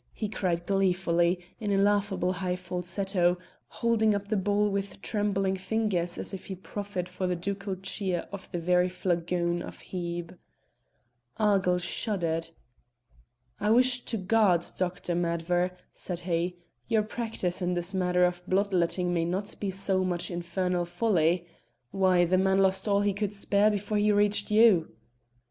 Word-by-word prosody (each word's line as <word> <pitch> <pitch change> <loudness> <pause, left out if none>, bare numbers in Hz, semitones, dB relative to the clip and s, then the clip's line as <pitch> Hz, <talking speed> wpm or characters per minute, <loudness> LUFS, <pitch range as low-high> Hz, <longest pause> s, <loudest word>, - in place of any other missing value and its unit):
he 215 - -2
cried 175 -4 -2
gleefully, 180 -2 +2 0.2
in 210 -2 -2
a 195 - +3
laughable 195 -2 +2
high 180 -1 -2
falsetto, 180 0 0 0.3
holding 220 -2 +1
up 200 0 -4
the 215 - +1
bowl 205 +1 +2
with 200 -1 -3
trembling 195 -3 0
fingers 190 -3 -1
as - - -6
if 190 - -7
he 190 - -5
proffered 190 -1 -5
for 180 +1 -3
the 180 - 0
ducal 200 +2 -3
cheer 190 -1 -2 0.2
the 175 - -2
very 180 +1 +2
flagon 175 -1 -1
of - - -8
Hebe. 175 -1 -4 1.0
Argyll 195 -4 +3
shuddered. 170 -3 -2 1.1
"I 210 - 0
wish 250 +2 +4
to 225 - -2
God, 190 -3 +3
Dr. 180 -1 -2
Madver," 175 +1 0 0.2
said 180 -2 -5
he, 175 0 -1 0.3
"your 220 -2 +2
practice 215 -5 -3
in 180 0 0
this 175 +2 -2
matter 180 -1 +3
of 175 0 -1
blood 200 +1 +1
letting 180 0 +1
may 165 -1 +1
not 190 +4 -2
be 200 - -2
so 190 0 0
much 175 -1 -1
infernal 175 +1 -1
folly. 175 -2 +1 0.5
Why! 185 -2 +3
the 185 +2 +2
man 190 0 +3
lost 190 +1 +2
all 200 -1 +3
he 205 -1 +1
could 205 +1 -2
spare 205 +1 +3
before 210 0 -1
he 210 0 +3
reached 205 0 +2
you." 210 - +4
185 Hz, 155 wpm, -28 LUFS, 175-205 Hz, 1.1 s, wish